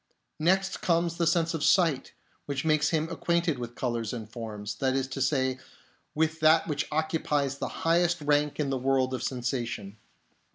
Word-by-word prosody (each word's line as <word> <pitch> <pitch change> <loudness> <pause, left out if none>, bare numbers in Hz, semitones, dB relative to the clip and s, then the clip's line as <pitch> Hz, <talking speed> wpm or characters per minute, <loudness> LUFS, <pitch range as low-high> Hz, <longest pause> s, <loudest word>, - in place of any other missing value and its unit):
Next 190 +4 +1
comes 170 -1 +1
the 170 -1 +1
sense 170 0 +2
of 160 -2 -2
sight, 165 -8 +3 0.3
which 140 0 -3
makes 155 -1 +3
him 160 -1 0
acquainted 170 -3 0
with 120 0 -6
colours 120 -3 -2
and 110 -3 -6
forms; 110 -3 -6
that 130 -1 0
is 135 -1 0
to 135 - -4
say, 130 -1 +1 0.6
with 160 +1 0
that 160 +1 +5
which 150 -2 -2
occupies 150 -3 0
the - - -2 0.2
highest 170 +1 +3
rank 145 0 +1
in 140 -2 0
the 135 - -1
world 130 0 +1
of 130 - -3
sensation. 120 -5 -3
145 Hz, 170 wpm, -28 LUFS, 130-165 Hz, 0.6 s, that